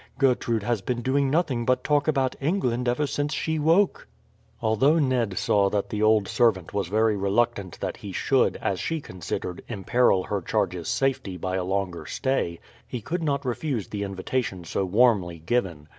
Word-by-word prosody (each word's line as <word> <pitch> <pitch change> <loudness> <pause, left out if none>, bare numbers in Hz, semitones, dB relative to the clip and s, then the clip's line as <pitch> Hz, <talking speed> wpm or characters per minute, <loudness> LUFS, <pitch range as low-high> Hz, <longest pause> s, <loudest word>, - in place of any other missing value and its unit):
Gertrude 120 -5 +1
has 115 -1 0
been 120 +3 -3
doing 135 +2 +2
nothing 140 -6 +1
but 125 +1 +1
talk 150 0 +2
about 135 -4 +1
England 125 -6 0
ever 125 +5 +1
since 145 +1 -2
she 160 -1 -1
woke." 165 +6 +2 0.5
Although 115 +8 +3
Ned 125 - +1
saw 100 -1 +3
that 100 +3 -2
the 105 -2 -2
old 110 -2 +4
servant 105 -9 +1
was 100 -3 -1
very 110 +2 +2
reluctant 100 -2 0
that - - -3
he - - -8
should, - - +2
as - - 0
she 160 0 -2
considered, 90 - -5
imperil 110 -1 +2
her 100 0 -2
charges' 85 -1 -1
safety 130 -9 -1
by 95 +2 -3
a 95 - -1
longer 95 -2 -2
stay, 130 -11 -1 0.3
he 125 - -4
could 165 - -3
not 140 -3 -1
refuse 125 - -2
the 105 - -4
invitation 100 0 -3
so 95 +3 -2
warmly 100 -4 +3
given. 85 -4 -2
115 Hz, 175 wpm, -25 LUFS, 95-135 Hz, 0.5 s, old